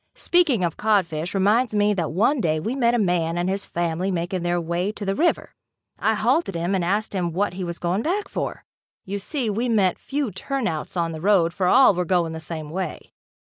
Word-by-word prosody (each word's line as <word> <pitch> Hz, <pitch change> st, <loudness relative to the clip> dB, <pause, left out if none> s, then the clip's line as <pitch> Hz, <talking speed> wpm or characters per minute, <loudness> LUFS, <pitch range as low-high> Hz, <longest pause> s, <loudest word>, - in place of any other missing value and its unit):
Speaking 305 Hz, -, +2 dB
of 170 Hz, -2 st, -1 dB
codfish, 180 Hz, -6 st, 0 dB
reminds 215 Hz, +4 st, +2 dB
me 210 Hz, 0 st, +3 dB
that 170 Hz, -5 st, -2 dB
one 230 Hz, -, +2 dB
day 155 Hz, -2 st, +1 dB
we 225 Hz, +11 st, -3 dB
met 240 Hz, -3 st, +2 dB
a -, -, +2 dB
man 175 Hz, -5 st, +1 dB
and 175 Hz, +1 st, 0 dB
his 195 Hz, +1 st, -2 dB
family 175 Hz, +2 st, -1 dB
making 180 Hz, 0 st, -2 dB
their 175 Hz, 0 st, 0 dB
way 170 Hz, +4 st, -1 dB
to 210 Hz, -1 st, -7 dB
the 195 Hz, -, 0 dB
river. 340 Hz, -, 0 dB, 0.5 s
I -, -, +2 dB
halted 320 Hz, -, +1 dB
him 170 Hz, +3 st, -1 dB
and 190 Hz, -2 st, +1 dB
asked 205 Hz, +5 st, -1 dB
him 175 Hz, -4 st, -1 dB
what 195 Hz, +1 st, 0 dB
he 185 Hz, +1 st, -5 dB
was 170 Hz, -1 st, -4 dB
going 180 Hz, +4 st, -1 dB
back 390 Hz, -, -1 dB
for. -, -, -4 dB, 0.4 s
You 200 Hz, +1 st, -3 dB
see 250 Hz, +4 st, -3 dB
we 225 Hz, +4 st, -1 dB
met 200 Hz, -5 st, +2 dB
few 275 Hz, -4 st, -2 dB
"turnouts" 190 Hz, -, -3 dB
on 170 Hz, -1 st, 0 dB
the 160 Hz, -1 st, -7 dB
road 180 Hz, -3 st, +3 dB
for 185 Hz, 0 st, 0 dB
all 260 Hz, +2 st, +6 dB
were 180 Hz, 0 st, -1 dB
going 175 Hz, -2 st, 0 dB
the 160 Hz, -, -5 dB
same 155 Hz, -1 st, -6 dB
way. 185 Hz, +2 st, -5 dB
190 Hz, 215 wpm, -23 LUFS, 170-215 Hz, 0.5 s, all